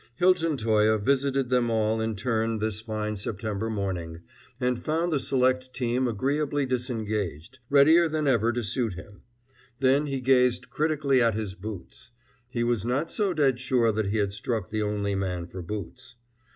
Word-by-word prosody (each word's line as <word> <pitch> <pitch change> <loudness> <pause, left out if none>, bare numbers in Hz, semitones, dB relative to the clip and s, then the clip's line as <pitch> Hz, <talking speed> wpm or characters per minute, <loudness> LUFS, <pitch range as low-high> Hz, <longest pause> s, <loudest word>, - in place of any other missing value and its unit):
Hilton 170 -2 +2
Toye 110 -2 +3
visited 135 +3 0
them 125 -2 +2
all 110 0 +1
in 110 -1 -1
turn 110 +1 -1
this 110 0 -2
fine 110 -1 -3
September 105 +1 -3
morning, 90 -6 -3 0.4
and 125 -1 -1
found 165 +2 0
the 145 - +2
select 130 -1 0
team 125 0 0
agreeably 140 +5 0
disengaged, 110 - -3
readier 160 +4 +6
than 155 -1 -1
ever 120 -3 +3
to 120 0 -2
suit 115 0 -1
him. 90 +4 -12 0.6
Then 135 +3 +3
he 135 -1 -2
gazed 125 -1 +2
critically 150 -4 +1
at 115 -2 +3
his 105 -3 -3
boots. 100 0 -9 0.4
He 120 -2 -1
was 120 -4 0
not 135 +7 -1
so 205 -3 0
dead 135 -4 +2
sure 125 -3 +2
that 110 -1 -1
he 105 +3 -1
had 100 -2 0
struck 110 -1 -3
the 110 0 -1
only 105 -1 -1
man 90 -3 -2
for 90 +1 -8
boots. 105 +7 -7
120 Hz, 165 wpm, -26 LUFS, 105-135 Hz, 0.6 s, readier